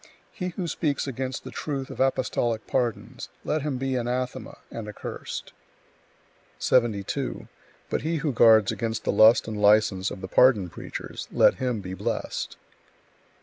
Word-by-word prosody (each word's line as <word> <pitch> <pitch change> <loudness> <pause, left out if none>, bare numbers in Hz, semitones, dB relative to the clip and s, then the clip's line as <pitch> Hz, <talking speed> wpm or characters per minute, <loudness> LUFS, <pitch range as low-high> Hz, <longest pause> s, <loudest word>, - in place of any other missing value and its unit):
He 180 - -4
who 180 0 -4
speaks 150 -3 -1
against 130 -1 -4
the - - -8
truth 135 -3 -4
of - - -9
apostolic 125 -4 0
pardons, 120 -4 -2 0.2
let 155 0 0
him 140 -2 -2
be 135 +1 -2
anathema 125 +1 -3
and 115 -2 -6
accursed! 105 - -7 1.0
72. 110 -6 0 0.4
But - - -2
he 165 +2 -1
who 150 -3 -1
guards 110 -3 +6
against 115 -1 -3
the - - +1
lust 110 +4 +6
and 105 -2 -4
license 105 -2 +4
of 95 - -8
the 95 - -5
pardon 105 -5 +4
preachers, - - -7
let - - +5
him 125 -5 -1
be 95 -1 -6
blessed! 95 - -3
120 Hz, 150 wpm, -26 LUFS, 105-135 Hz, 1.0 s, guards